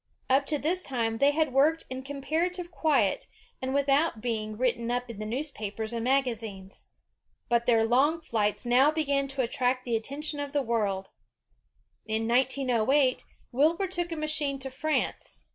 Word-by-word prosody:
Up 275 Hz, +1 st, +3 dB
to 300 Hz, -, 0 dB
this 340 Hz, +6 st, 0 dB
time 230 Hz, -6 st, -2 dB
they 280 Hz, -, +5 dB
had 300 Hz, -2 st, +1 dB
worked 310 Hz, +5 st, +3 dB
in 260 Hz, 0 st, -5 dB
compar 285 Hz, +5 st, -1 dB
ative 360 Hz, -1 st, -7 dB
quiet, 280 Hz, -, +1 dB, 0.3 s
and 260 Hz, 0 st, -2 dB
without 280 Hz, 0 st, +2 dB
being 215 Hz, -2 st, -3 dB
written 235 Hz, -1 st, 0 dB
up 245 Hz, 0 st, -2 dB
in 215 Hz, -, -10 dB
the 215 Hz, -, -4 dB
newspapers 220 Hz, -4 st, -4 dB
and 230 Hz, -1 st, -2 dB
magazines. 230 Hz, -7 st, -2 dB, 0.6 s
But 235 Hz, 0 st, +2 dB
their 225 Hz, -2 st, +4 dB
long 275 Hz, +8 st, +3 dB
flights 215 Hz, -7 st, -1 dB
now 250 Hz, +4 st, +5 dB
began 285 Hz, -3 st, 0 dB
to 270 Hz, -1 st, -1 dB
at 235 Hz, -, -3 dB
tract 255 Hz, 0 st, 0 dB
the 240 Hz, -2 st, -1 dB
attention 290 Hz, +6 st, -4 dB
of 285 Hz, 0 st, -4 dB
the 285 Hz, -1 st, +1 dB
world. 205 Hz, -5 st, -1 dB, 1.0 s
In 220 Hz, +1 st, -1 dB
1908, 255 Hz, +1 st, +2 dB, 0.3 s
Wilbur 315 Hz, +9 st, +2 dB
took 350 Hz, -2 st, -3 dB
a -, -, -2 dB
machine 305 Hz, -2 st, -1 dB
to 265 Hz, 0 st, -6 dB
France. 310 Hz, +4 st, -2 dB
265 Hz, 165 wpm, -28 LUFS, 230-295 Hz, 1.0 s, they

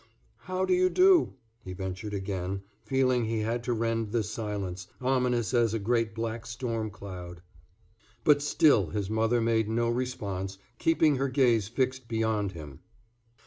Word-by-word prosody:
"How 185 Hz, 0 st, -1 dB
do 185 Hz, -, +2 dB
you 185 Hz, 0 st, +4 dB
do?" 365 Hz, -, +5 dB, 0.3 s
he 90 Hz, -, -7 dB
ventured 95 Hz, +2 st, -5 dB
again, 95 Hz, 0 st, -3 dB, 0.2 s
feeling 130 Hz, 0 st, +2 dB
he 110 Hz, 0 st, -1 dB
had 115 Hz, +2 st, -2 dB
to 125 Hz, -, +1 dB
rend 115 Hz, -1 st, -1 dB
this 110 Hz, -3 st, -1 dB
silence, 100 Hz, -5 st, -4 dB
ominous 125 Hz, -3 st, +1 dB
as 115 Hz, -2 st, +3 dB
a -, -, +1 dB
great 115 Hz, +1 st, 0 dB
black 115 Hz, 0 st, -4 dB
storm 115 Hz, -2 st, -3 dB
cloud. 90 Hz, -3 st, -9 dB, 0.8 s
But 145 Hz, -1 st, +5 dB
still 145 Hz, -, +4 dB
his 100 Hz, +5 st, -3 dB
mother 115 Hz, +2 st, +2 dB
made 115 Hz, -1 st, +1 dB
no 115 Hz, +1 st, +1 dB
response, 100 Hz, -6 st, -3 dB, 0.2 s
keeping 160 Hz, -3 st, +3 dB
her 135 Hz, +1 st, 0 dB
gaze 120 Hz, -6 st, +3 dB
fixed 130 Hz, +1 st, -1 dB
beyond 110 Hz, -3 st, 0 dB
him. 75 Hz, -5 st, -9 dB
115 Hz, 150 wpm, -28 LUFS, 100-125 Hz, 0.8 s, do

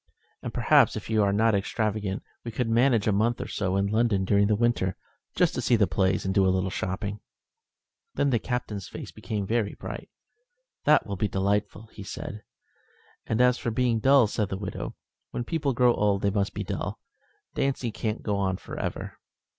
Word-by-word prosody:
"And -, -, -5 dB
perhaps, -, -, +4 dB
if -, -, -6 dB
you 110 Hz, -1 st, +3 dB
are 100 Hz, -1 st, +3 dB
not 110 Hz, +2 st, +3 dB
extravagant, 105 Hz, -1 st, -1 dB, 0.2 s
we 120 Hz, -, -5 dB
could 115 Hz, +1 st, -2 dB
manage 115 Hz, -1 st, +3 dB
a 105 Hz, -, +3 dB
month 110 Hz, +4 st, +1 dB
or -, -, -4 dB
so 95 Hz, -2 st, -1 dB
in 100 Hz, 0 st, +2 dB
London 105 Hz, -2 st, +1 dB
during 100 Hz, +1 st, +3 dB
the 105 Hz, -, +3 dB
winter, 110 Hz, -5 st, +1 dB, 0.4 s
just -, -, +3 dB
to -, -, -2 dB
see 120 Hz, -, +3 dB
the 105 Hz, -3 st, +4 dB
plays 95 Hz, -1 st, +1 dB
and 95 Hz, -, 0 dB
do 95 Hz, -, +4 dB
a 95 Hz, -, +4 dB
little 95 Hz, 0 st, 0 dB
shopping." 100 Hz, +3 st, -3 dB, 1.0 s
Then 140 Hz, -, +2 dB
the 120 Hz, -, +3 dB
Captain's 110 Hz, -6 st, -3 dB
face -, -, -8 dB
became 105 Hz, -3 st, -4 dB
very 110 Hz, 0 st, 0 dB
bright. -, -, -7 dB, 0.8 s
"That 150 Hz, -, +5 dB
will 100 Hz, -2 st, -4 dB
be 105 Hz, -, +1 dB
delightful," 100 Hz, +2 st, -1 dB, 0.2 s
said 100 Hz, -, -6 dB
he. -, -, -20 dB
"And 110 Hz, +2 st, +2 dB
as 125 Hz, 0 st, +4 dB
for -, -, -2 dB
being 115 Hz, 0 st, +1 dB
dull," 135 Hz, +2 st, +6 dB
said 105 Hz, -1 st, -1 dB
the 95 Hz, -, -3 dB
widow, 100 Hz, -1 st, -5 dB, 0.3 s
"when 120 Hz, -, -3 dB
people 145 Hz, +1 st, -1 dB
grow 125 Hz, -1 st, +4 dB
old 100 Hz, -2 st, +1 dB
they 100 Hz, -, +3 dB
must 100 Hz, -1 st, -1 dB
be -, -, -2 dB
dull. -, -, -4 dB, 0.5 s
Dancing 130 Hz, -4 st, -1 dB
can't 110 Hz, +1 st, -3 dB
go 105 Hz, -2 st, 0 dB
on 95 Hz, -2 st, 0 dB
for -, -, -8 dB
ever." -, -, -5 dB
105 Hz, 195 wpm, -27 LUFS, 100-120 Hz, 1.0 s, dull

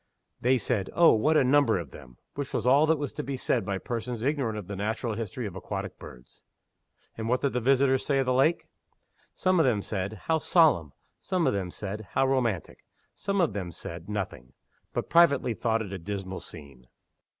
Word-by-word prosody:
They 130 Hz, +2 st, +3 dB
said, 105 Hz, -4 st, -1 dB
"Oh, 170 Hz, -1 st, +7 dB
what 150 Hz, +8 st, +3 dB
a -, -, +5 dB
number 130 Hz, -4 st, +4 dB
of 80 Hz, -7 st, -6 dB
them!" 60 Hz, -2 st, -13 dB, 0.2 s
which 140 Hz, -2 st, -5 dB
was -, -, -1 dB
all 140 Hz, +5 st, +5 dB
that 160 Hz, 0 st, +3 dB
was 145 Hz, -2 st, -4 dB
to -, -, -4 dB
be 135 Hz, +1 st, -4 dB
said 125 Hz, -2 st, 0 dB
by 100 Hz, 0 st, -2 dB
persons 120 Hz, +2 st, -4 dB
ignorant 135 Hz, -6 st, 0 dB
of 105 Hz, -, -6 dB
the 100 Hz, -, -6 dB
natural 110 Hz, +4 st, -2 dB
history 115 Hz, +2 st, -4 dB
of 95 Hz, -3 st, -6 dB
aquatic 95 Hz, -, -5 dB
birds. 60 Hz, 0 st, -13 dB, 0.8 s
And 110 Hz, 0 st, -3 dB
what 125 Hz, +1 st, +1 dB
did 140 Hz, -, 0 dB
the 125 Hz, -, +1 dB
visitors 135 Hz, +1 st, +3 dB
say 140 Hz, -, +1 dB
of 135 Hz, -, +2 dB
the 125 Hz, -, +1 dB
lake? 145 Hz, +7 st, +2 dB, 0.7 s
Some 185 Hz, -1 st, +2 dB
of 160 Hz, -, +4 dB
them 105 Hz, -5 st, +1 dB
said, 100 Hz, 0 st, -4 dB
"How 160 Hz, -1 st, +2 dB
solemn!" 140 Hz, -, +3 dB, 0.3 s
Some 185 Hz, -3 st, -1 dB
of -, -, +2 dB
them 95 Hz, -3 st, -2 dB
said, 105 Hz, +3 st, -6 dB
"How -, -, +3 dB
romantic!" 120 Hz, -9 st, -1 dB, 0.3 s
Some 200 Hz, 0 st, -2 dB
of 170 Hz, -4 st, +2 dB
them 95 Hz, -4 st, -4 dB
said 85 Hz, +4 st, -8 dB
nothing 95 Hz, -12 st, -5 dB, 0.4 s
but -, -, -3 dB
privately 140 Hz, -8 st, +4 dB
thought 115 Hz, 0 st, 0 dB
it 100 Hz, -2 st, -8 dB
a 95 Hz, -, -5 dB
dismal 95 Hz, +1 st, -5 dB
scene. 70 Hz, -5 st, -12 dB
115 Hz, 205 wpm, -27 LUFS, 100-140 Hz, 0.8 s, Oh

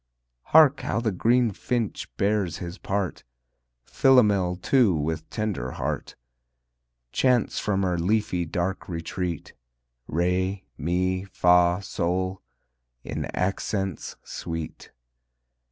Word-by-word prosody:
Hark 150 Hz, -3 st, +6 dB
how -, -, -1 dB
the 115 Hz, -2 st, 0 dB
green 115 Hz, +5 st, +3 dB
finch 115 Hz, +2 st, -2 dB
bears 100 Hz, -4 st, +1 dB
his 90 Hz, +1 st, -7 dB
part, 95 Hz, -3 st, -2 dB, 0.6 s
Philomel, 105 Hz, -, +4 dB
too, 105 Hz, +1 st, +3 dB
with 80 Hz, +1 st, -2 dB
tender 100 Hz, -, -3 dB
heart, -, -, -3 dB, 1.0 s
Chants 125 Hz, -, +2 dB
from 100 Hz, -2 st, 0 dB
her 90 Hz, -2 st, 0 dB
leafy 95 Hz, -1 st, +1 dB
dark 90 Hz, +3 st, -3 dB
retreat 85 Hz, 0 st, -4 dB, 0.5 s
Re, 90 Hz, +4 st, 0 dB
mi, 90 Hz, +4 st, 0 dB
fa, 90 Hz, -1 st, +3 dB
sol, 95 Hz, +1 st, -2 dB, 0.6 s
in -, -, -4 dB
accents 95 Hz, -1 st, -2 dB
sweet. 80 Hz, -1 st, -6 dB
95 Hz, 100 wpm, -26 LUFS, 85-105 Hz, 1.0 s, Hark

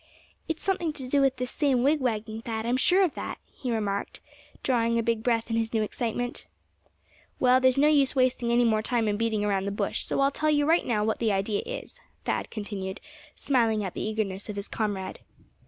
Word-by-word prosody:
"It's 325 Hz, -1 st, -3 dB
something 365 Hz, -5 st, 0 dB
to 265 Hz, -3 st, -7 dB
do 280 Hz, +2 st, +2 dB
with 270 Hz, -1 st, +3 dB
this 250 Hz, -1 st, -3 dB
same 270 Hz, -5 st, +2 dB
wigwagging, 230 Hz, -6 st, 0 dB
Thad, 225 Hz, -1 st, -4 dB
I'm 240 Hz, +2 st, +1 dB
sure 365 Hz, +9 st, +4 dB
of 350 Hz, -, +1 dB
that?" -, -, -5 dB, 0.2 s
he 250 Hz, -, -4 dB
remarked, 205 Hz, -3 st, -2 dB, 0.4 s
drawing 235 Hz, -2 st, +2 dB
a 230 Hz, -, +1 dB
big 230 Hz, -1 st, 0 dB
breath 230 Hz, -1 st, 0 dB
in 225 Hz, -, +1 dB
his 225 Hz, 0 st, -1 dB
new 220 Hz, -, +2 dB
excitement. 240 Hz, +3 st, -3 dB, 0.9 s
"Well, 255 Hz, 0 st, +5 dB
there's 260 Hz, 0 st, +4 dB
no 290 Hz, +2 st, +5 dB
use 285 Hz, -3 st, +3 dB
wasting 255 Hz, -2 st, +2 dB
any 240 Hz, +1 st, +4 dB
more 220 Hz, -2 st, +3 dB
time 230 Hz, -1 st, 0 dB
in 205 Hz, -, +1 dB
beating 220 Hz, -1 st, 0 dB
around 195 Hz, -2 st, 0 dB
the 200 Hz, -, -1 dB
bush, 200 Hz, 0 st, -1 dB
so -, -, -1 dB
I'll 275 Hz, 0 st, +4 dB
tell 310 Hz, +2 st, 0 dB
you 290 Hz, -1 st, +3 dB
right 330 Hz, +3 st, +3 dB
now 215 Hz, -4 st, +1 dB
what 220 Hz, +1 st, 0 dB
the 225 Hz, -2 st, +2 dB
idea 200 Hz, +1 st, 0 dB
is," -, -, -6 dB, 0.3 s
Thad -, -, -1 dB
continued, 200 Hz, -3 st, -5 dB, 0.4 s
smiling 230 Hz, -6 st, +1 dB
at 190 Hz, -3 st, -4 dB
the -, -, -5 dB
eagerness 210 Hz, -2 st, -3 dB
of 210 Hz, -, -4 dB
his 200 Hz, +1 st, -4 dB
comrade. 205 Hz, -4 st, -3 dB
230 Hz, 210 wpm, -27 LUFS, 215-260 Hz, 0.9 s, Well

